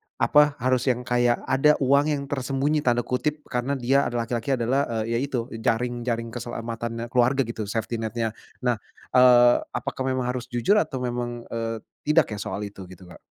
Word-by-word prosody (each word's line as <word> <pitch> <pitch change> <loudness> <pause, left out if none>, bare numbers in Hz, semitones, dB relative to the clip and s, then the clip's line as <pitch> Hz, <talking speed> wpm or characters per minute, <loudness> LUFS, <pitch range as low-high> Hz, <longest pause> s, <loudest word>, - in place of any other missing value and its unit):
apa, 150 -1 +4
harus 130 0 +1
yang 125 -1 +1
kayak 120 0 +1
ada 150 +3 +3
uang 140 +2 +4
yang 145 -2 -1
"tersembunyi" 140 +2 0
tanda 120 -4 +1
kutip, 150 +5 -2
karena 125 +3 -1
dia 135 +2 +2
ada 120 - -5
laki-laki 120 +3 -1
adalah, 130 +4 0 0.2
eee, 115 - -4
ya 115 - +1
itu 135 -1 -1 0.2
jaring 120 +2 -1
jaring 115 -1 -2
keselamatannya 115 0 -5
keluarga 130 +2 +3
gitu, 110 -3 -5
safety 115 +2 -3
net-nya. 115 0 -2 0.3
Nah, 120 -3 +1 0.3
eee, 125 -1 +7 0.2
apakah 140 -2 -3
memang 130 -1 0
harus 125 -1 -5
jujur 125 - +2
atau 130 -10 -2
memang, 120 -1 -3
eee, 115 -1 -3 0.2
tidak 150 -4 +3
ya 105 - -4
soal 100 +1 -4
itu 100 -2 -8
gitu 95 0 -13
Kak? - - -13
120 Hz, 180 wpm, -25 LUFS, 115-135 Hz, 0.3 s, eee